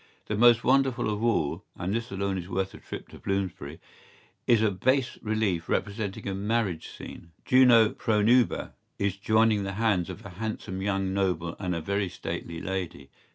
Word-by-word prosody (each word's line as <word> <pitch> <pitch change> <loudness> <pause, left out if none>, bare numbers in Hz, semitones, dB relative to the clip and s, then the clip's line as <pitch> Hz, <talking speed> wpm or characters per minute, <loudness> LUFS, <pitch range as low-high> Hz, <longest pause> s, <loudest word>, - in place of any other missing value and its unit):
¬Ý - - -42
The 105 - 0
most 120 +1 +6
wonderful 130 -4 +2
of 105 +2 -4
all, 105 -11 +1
and 90 +3 -3
this 115 +2 -2
alone 95 -2 -2
is 90 +1 -8
worth 95 0 -2
a - - -11
trip - - -8
to - - -12
Bloomsbury, 95 -6 -3 0.7
is 115 -2 +4
a 110 - +3
bas 130 +6 0
relief 105 -7 -1
representing 100 -1 -2
a 100 - -1
marriage 100 -4 -1
scene, 85 -1 -11
Juno 120 -4 +6
Pronuba 115 +3 +2 0.2
is 100 -1 0
joining 110 +1 +3
the 95 0 -3
hands 100 -4 +1
of 95 - -8
a - - -7
handsome 95 -1 -5
young 95 -1 -1
noble 90 -4 -1
and 90 -2 -2
a 85 - -3
very 100 +2 -1
stately 85 -1 -5
lady. 85 -7 -5
100 Hz, 175 wpm, -27 LUFS, 95-110 Hz, 0.7 s, most